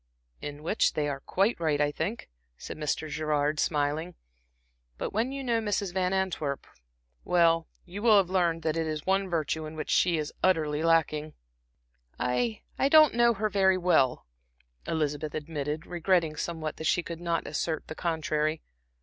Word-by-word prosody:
"In 145 0 -7
which 190 +7 +2
they 150 -1 0
are 140 -1 -3
quite 195 +9 0
right, 155 -3 +1
I 145 0 +2
think," 180 +10 -4 0.3
said - - -7
Mr. 155 +1 -2
Gerard, 150 -1 0
smiling. 150 +3 0 0.8
"But - - -4
when 225 +5 0
you 275 0 -5
know 235 -3 +1
Mrs. 205 -3 -1
Van 185 -1 0
Antwerp 180 -7 -1 0.6
well, 165 -2 +3 0.2
you 190 +3 -7
will 220 -2 +6
have 195 -3 +4
learned 170 -3 +1
that 155 -1 0
it 165 -1 -1
is 155 -1 -3
the - - -27
one 195 0 +1
virtue 160 -1 -1
in 155 - -9
which 155 - -4
she 170 -2 +3
is 150 -1 -3
utterly 155 -5 +2
lacking." 155 -2 +1 0.8
"I 125 -3 -1 0.2
I 270 - +3
don't 310 0 +7
know 235 0 +4
her 215 +2 0
very 190 -2 +3
well," 175 -8 +2 0.6
Elizabeth 150 -1 -2
admitted, 150 0 -4
regretting 175 -2 +1
somewhat 155 -1 -4
that 160 - -3
she 175 - +2
could 170 0 -7
not 170 -1 -1
assert 160 -2 -2
the - - -7
contrary. 155 -1 -1
165 Hz, 170 wpm, -28 LUFS, 150-185 Hz, 0.8 s, don't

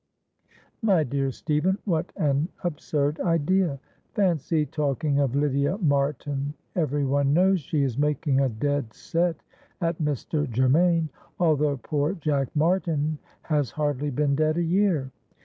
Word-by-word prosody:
"My 195 -8 +3
dear 135 0 -1
Stephen, 155 +8 0
what 170 -3 -1
an 150 -1 +1
absurd 150 -3 -1
idea! 165 -2 +1 0.4
Fancy 165 -6 +1
talking 145 0 0
of 135 -2 +1
Lydia 140 +4 +1
Martin, 145 - 0 0.2
every 145 -4 0
one 140 +1 +2
knows 190 +2 +4
she 145 0 -1
is 130 -1 -1
making 145 -2 +1
a 135 - +2
dead 130 0 -2
set 170 -1 -1 0.4
at 165 -2 -1
Mr. 150 0 -1
Germaine, 160 +7 +3 0.3
although 150 -4 +2
poor 145 - -1
Jack 145 -5 0
Martin 155 -2 +1 0.2
has 150 -5 0
hardly 145 -1 -1
been 140 +1 +1
dead 155 +2 +1
a 175 - +1
year. 170 -6 +1
150 Hz, 130 wpm, -25 LUFS, 140-165 Hz, 0.4 s, knows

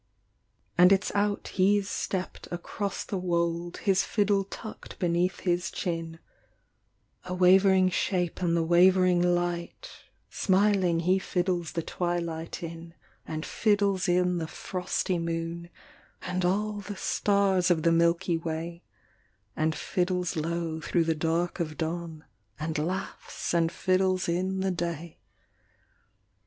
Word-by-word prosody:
And 180 +1 +8
it 195 +1 +4
s - - -3
out 205 0 0
he 195 +2 +3
s 195 - -6
stepped 185 -2 -4
across 195 +3 -4
the 195 - -3
wold 170 -1 -1
His 195 -2 +3
fiddle 205 -2 +1
tucked 215 +3 -9
beneath 175 0 0
his 175 -1 0
chin 165 -3 -4 1.1
A 180 0 -4
wavering 185 +1 +5
shape 180 -1 -1
in 170 -2 +2
the 165 - +2
wavering 180 +1 +5
light, 175 - -1 0.4
Smiling 190 -3 +2
he 185 +3 +3
fiddles 175 -4 -1
the 165 - -2
twilight 170 -1 -3
in, 165 0 -8 0.3
And 155 0 -4
fiddles 200 -3 +1
in 180 0 +2
the 160 - -3
frosty 180 0 -2
moon, 165 +1 -3 0.5
And 185 0 -2
all 205 +3 0
the 205 -1 -7
stars 195 -3 +2
of 165 -3 +2
the 170 - +4
Milky 170 +1 +2
Way, 165 +1 -5 0.7
And 155 0 0
fiddles 180 -1 -1
low 165 0 -2
through 170 +1 +1
the 165 0 +1
dark 165 +3 -1
of 155 -2 -3
dawn, 165 -1 -4 0.3
And 155 0 -2
laughs 180 +3 -4
and 165 -1 +2
fiddles 185 +1 +1
in 185 +2 -1
the 190 0 +1
day. 170 -2 -4
175 Hz, 130 wpm, -28 LUFS, 170-190 Hz, 1.1 s, And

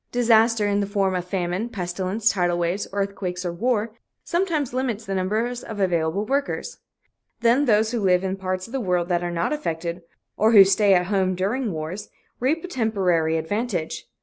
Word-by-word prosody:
Disaster, 230 -2 +3
in 205 0 +1
the 200 - -1
form 195 -2 0
of 180 -1 -2
famine, 180 +4 -2
pestilence, 190 +2 -1
tidal 175 -3 0
waves, 175 +3 -1
earthquakes 195 -2 -3
or 175 - -2
war, 225 +3 0 0.3
sometimes 335 -8 -1
limits 245 -4 -2
the 195 - -3
number 195 +5 0
of 245 0 -5 0.2
available 175 +1 0
workers. 280 - -2 0.6
Then 240 +5 +4
those 220 -2 +3
who 240 - -1
live 185 -2 +2
in 190 0 -1
parts 185 -1 -3
of - - -13
the 270 - -1
world 180 -3 0
that 175 -1 +1
are 175 - -2
not 170 - -1
affected, 170 - -3 0.4
or 220 +2 +3
who 200 -3 +10
stay 195 0 +4
at 180 0 +2
home 190 -1 +1
during 210 +6 -1
wars, 170 +6 -5 0.3
reap 300 +7 0
a - - -5
temporary 185 - +1
advantage. 180 0 -3
200 Hz, 180 wpm, -23 LUFS, 180-230 Hz, 0.6 s, who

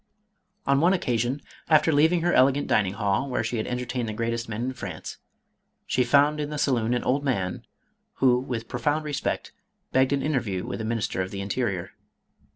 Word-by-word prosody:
On 140 0 +3
one 175 +3 +5
occasion, 125 -5 -1 0.3
after 155 0 +5
leaving 160 +4 +4
her 175 +1 +2
elegant 135 +2 +4
dining 100 -3 +2
hall, 100 +5 0
where 125 - 0
she 115 +2 -2
had 110 - -2
entertained 125 -1 -2
the - - -3
greatest 115 +1 -2
men 110 +2 -3
in 130 +1 -2
France, 120 - -7 0.7
she 125 - +1
found 145 +4 +4
in 150 -1 -2
the 150 - -4
saloon 125 -4 +1
an 120 - -1
old 135 +3 +1
man, 95 -10 -2 0.5
who, 125 -2 +4
with 120 -3 -4
profound 145 +6 -1
respect, 145 -2 -2 0.4
begged 130 0 +3
an 140 -1 +1
interview 120 -11 -1
with - - -5
the 110 - -3
Minister 110 -4 -1
of 95 - -3
the 100 - -6
Interior. 100 -3 -2
125 Hz, 185 wpm, -26 LUFS, 115-145 Hz, 0.7 s, one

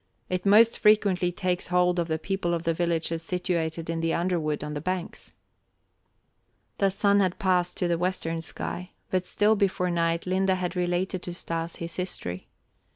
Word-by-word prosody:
It 185 +1 -1
most 220 +3 +6
frequently 200 -4 +3
takes 180 0 -2
hold 180 0 +2
of 170 - 0
the 160 -1 0
people 175 +1 -1
of 165 - -4
the 165 -1 +1
villages 165 -1 -1
situated 165 -2 -2
in 165 0 -2
the 165 0 +1
underwood 165 -5 -1
on 150 0 -4
the 145 - -4
banks." 185 +1 -4 1.5
The 195 - +4
sun 200 +1 +3
had 185 -2 +1
passed 180 -3 +1
to 180 - 0
the 170 -1 0
western 170 -2 -1
sky, 180 +2 -5 0.2
but 185 -1 0
still 210 +3 +3
before 185 -3 +1
night 170 0 0
Linde 190 +1 +1
had 180 0 -3
related 180 +1 -1
to 175 -1 -6
Stas 165 -1 -3
his 170 0 -5
history. 95 - -3
180 Hz, 170 wpm, -27 LUFS, 165-185 Hz, 1.5 s, most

